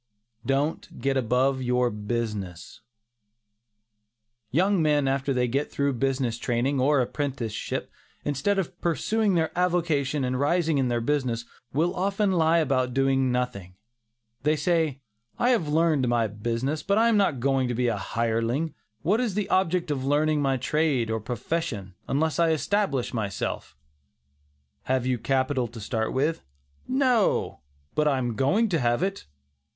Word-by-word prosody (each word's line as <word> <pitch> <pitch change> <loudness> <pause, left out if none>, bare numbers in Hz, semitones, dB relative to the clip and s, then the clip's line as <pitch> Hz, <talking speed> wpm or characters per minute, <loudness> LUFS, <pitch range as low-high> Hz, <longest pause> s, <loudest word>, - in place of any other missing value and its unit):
DON'T 140 +4 -1
GET 135 0 0
ABOVE 130 +2 +1
YOUR 125 -1 +1
BUSINESS. 105 -3 -4 1.7
Young 185 - +2
men 150 -3 +2
after 135 +1 0
they 125 -2 +1
get 140 +5 -1
through 140 0 0
their 125 - -6
business 130 -3 0
training, 125 +3 0
or 140 +1 +3
apprenticeship, 125 -4 -3 0.3
instead 145 +8 0
of 185 -2 -3
pursuing 200 +4 +1
their 160 -2 0
avocation 165 -6 +1
and 130 0 -1
rising 160 +1 +2
in 130 - +1
their 120 -1 0
business, 120 -3 -1 0.3
will 165 +6 +1
often 195 +2 +1
lie 165 -2 +3
about 130 -5 +1
doing 135 -1 +2
nothing. 125 -8 -3 0.7
They 150 +3 +2
say, 155 -3 0 0.4
"I 245 - +3
have 220 -11 +1
learned 155 -4 +2
my 120 -1 +2
business, 115 +8 -2
but 200 +1 +1
I 230 +1 +5
am 230 - +3
not 195 -10 +2
going 135 0 +1
to 120 - -2
be 125 +1 0
a 115 - +1
hireling; 115 +8 -1 0.3
what 205 +7 +2
is 225 -6 -1
the 210 -1 -1
object 180 -3 +1
of 135 -3 -2
learning 150 +2 +2
my 135 -1 +1
trade 135 -3 0
or 110 - 0
profession, 115 - -3
unless 155 +4 0
I 165 -1 +4
establish 160 - 0
myself?" 100 - -3 1.1
"Have 130 -1 0
you 130 -2 0
capital 130 +1 0
to 115 0 -10
start 110 +1 -2
with?" 150 +5 0 0.5
"No, 255 -5 +2 0.3
but 150 0 +2
I 140 -2 +2
am 120 -2 -1
going 145 - +2
to 165 -4 +1
have 120 +3 +1
it." 195 +1 -3
135 Hz, 155 wpm, -26 LUFS, 125-165 Hz, 1.7 s, I